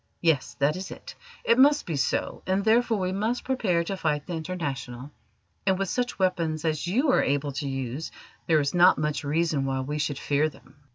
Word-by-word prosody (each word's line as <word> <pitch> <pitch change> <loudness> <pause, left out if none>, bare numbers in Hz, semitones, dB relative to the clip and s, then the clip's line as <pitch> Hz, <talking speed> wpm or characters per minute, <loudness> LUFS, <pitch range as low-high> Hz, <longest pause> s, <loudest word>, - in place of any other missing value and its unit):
Yes, 160 -6 +1
that 140 +2 +1
is 185 +1 -6
it: - - -10 0.3
it 235 - +3
must 290 +2 +5
be 165 - -3
so, 135 - -1
and 190 +2 +1
therefore 230 0 +3
we 185 -1 -1
must 220 +6 -1
prepare 205 -10 +1
to 195 +3 -3
fight 150 -5 -1
the 180 - -5
International; 145 -6 -5 0.5
and 190 -1 +2
with 195 -1 -2
such 245 0 -2
weapons 170 -4 0
as 155 +1 -1
you 260 - +2
are - - +4
able 145 +1 0
to 140 +1 -4
use 135 +3 -4 0.4
there 160 -2 +4
is 140 -1 -1
not 180 +1 +6
much 150 -1 -1
reason 155 -1 0
why 135 -1 -1
we 150 +3 -3
should 145 -1 -1
fear 145 +2 +1
them." - - -19
160 Hz, 205 wpm, -26 LUFS, 145-190 Hz, 0.5 s, not